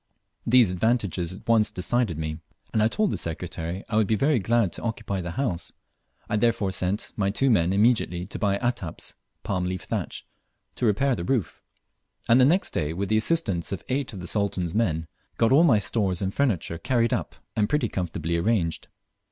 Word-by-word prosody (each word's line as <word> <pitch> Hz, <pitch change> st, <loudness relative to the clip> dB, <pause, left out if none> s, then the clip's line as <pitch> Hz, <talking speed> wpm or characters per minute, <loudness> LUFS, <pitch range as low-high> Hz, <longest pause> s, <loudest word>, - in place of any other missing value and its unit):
These 120 Hz, -5 st, +5 dB
advantages 95 Hz, -3 st, 0 dB
at 95 Hz, -, -13 dB
once 115 Hz, -2 st, +4 dB
decided 95 Hz, -1 st, -1 dB
me, 80 Hz, 0 st, -4 dB, 0.3 s
and 110 Hz, -, +2 dB
I 110 Hz, -, +5 dB
told 205 Hz, -, 0 dB
the -, -, -1 dB
Secretary 85 Hz, +2 st, -4 dB
I 110 Hz, -, -1 dB
would 110 Hz, -2 st, +3 dB
be 110 Hz, -, +2 dB
very 140 Hz, +3 st, +2 dB
glad 115 Hz, -2 st, +1 dB
to -, -, -7 dB
occupy 100 Hz, -4 st, -3 dB
the 85 Hz, -, -5 dB
house. 105 Hz, -12 st, -2 dB, 0.5 s
I 105 Hz, -, 0 dB
therefore 105 Hz, -3 st, +1 dB
sent 95 Hz, +2 st, -2 dB
my 100 Hz, -2 st, +1 dB
two 130 Hz, +6 st, +2 dB
men 85 Hz, -5 st, +3 dB
immediately 100 Hz, -4 st, +2 dB
to 95 Hz, -, -6 dB
buy 100 Hz, -2 st, +1 dB
"ataps" 120 Hz, -7 st, -3 dB, 0.3 s
(palm 90 Hz, -2 st, -1 dB
leaf 90 Hz, 0 st, -3 dB
thatch) -, -, -4 dB, 0.5 s
to 120 Hz, -, +1 dB
repair 130 Hz, +6 st, +2 dB
the 85 Hz, -, -4 dB
roof, 115 Hz, -2 st, -1 dB, 0.7 s
and 120 Hz, +3 st, +6 dB
the -, -, +7 dB
next 175 Hz, +8 st, +2 dB
day, 75 Hz, +1 st, -1 dB
with 95 Hz, +3 st, -3 dB
the 110 Hz, -, +3 dB
assistance 110 Hz, -, 0 dB
of 95 Hz, -, -4 dB
eight 135 Hz, 0 st, -1 dB
of 95 Hz, -5 st, -8 dB
the -, -, -6 dB
Sultan's 95 Hz, -3 st, -1 dB
men, 85 Hz, -8 st, 0 dB, 0.3 s
got 115 Hz, -, +3 dB
all 145 Hz, +5 st, +6 dB
my 135 Hz, -10 st, +5 dB
stores 100 Hz, -3 st, 0 dB
and 95 Hz, -1 st, -2 dB
furniture 95 Hz, -, 0 dB
carried 120 Hz, -1 st, +1 dB
up -, -, -3 dB, 0.2 s
and 105 Hz, -1 st, +1 dB
pretty 150 Hz, -5 st, +1 dB
comfortably 85 Hz, -3 st, -2 dB
arranged. 85 Hz, -3 st, 0 dB
105 Hz, 195 wpm, -25 LUFS, 90-120 Hz, 0.7 s, the